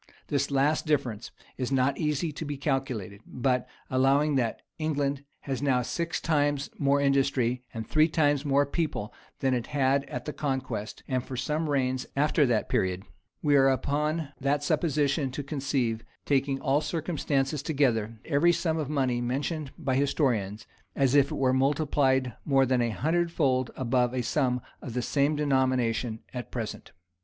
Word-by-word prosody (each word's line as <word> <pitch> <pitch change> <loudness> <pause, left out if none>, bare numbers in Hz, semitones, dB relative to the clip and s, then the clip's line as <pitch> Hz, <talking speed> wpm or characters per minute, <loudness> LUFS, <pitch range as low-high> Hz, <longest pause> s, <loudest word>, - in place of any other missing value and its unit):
This 140 -1 0
last 145 +3 +1
difference 125 -8 -1 0.3
is 130 0 -2
not 135 +1 +2
easy 150 +1 0
to 150 - -6
be 145 -2 -4
calculated; 130 - -2
but, 125 0 -1 0.2
allowing 135 +3 +3
that 120 -5 -1 0.2
England 145 -3 -1 0.2
has 135 -2 -3
now 130 -3 +2
six 170 +6 -2
times 145 -3 0
more 140 0 +3
industry, 135 -3 +2
and 110 -2 -6
three 155 0 +4
times 145 -3 +2
more 140 -1 +3
people 140 -8 -3 0.3
than 130 -1 +2
it 120 -2 -1
had 140 -1 +1
at - - -6
the 150 - -4
conquest, 130 -7 -3
and 130 -2 -1
for 130 - -7
some 150 +4 -1
reigns 130 -2 0
after 145 0 +3
that 115 -3 +1
period, 95 0 0 0.4
we 145 -2 +4
are 135 -1 +6
upon 150 +3 0
that 140 +2 0
supposition 145 -3 +1
to 140 +3 -5
conceive, 135 -6 -1 0.2
taking 135 -1 +1
all 140 +3 +2
circumstances 150 -3 -1
together, 120 -8 0
every 160 +3 +4
sum 165 -2 0
of 150 -3 -3
money 130 -5 0
mentioned 140 +4 -2
by 135 -5 -1
historians, 125 -7 0 0.3
as 135 -2 +2
if 140 -1 +5
it - - -2
were 130 -1 +2
multiplied 135 -2 +2
more 135 -3 +3
than 130 -1 +2
a 120 - +1
hundred 165 - 0
fold 130 -6 +1
above 125 0 +1
a 125 - 0
sum 125 0 0 0.2
of 125 - -7
the 125 - +1
same 145 +3 +1
denomination 130 -5 +1
at 125 -1 -5
present. 115 -4 -5
135 Hz, 165 wpm, -28 LUFS, 125-145 Hz, 0.4 s, are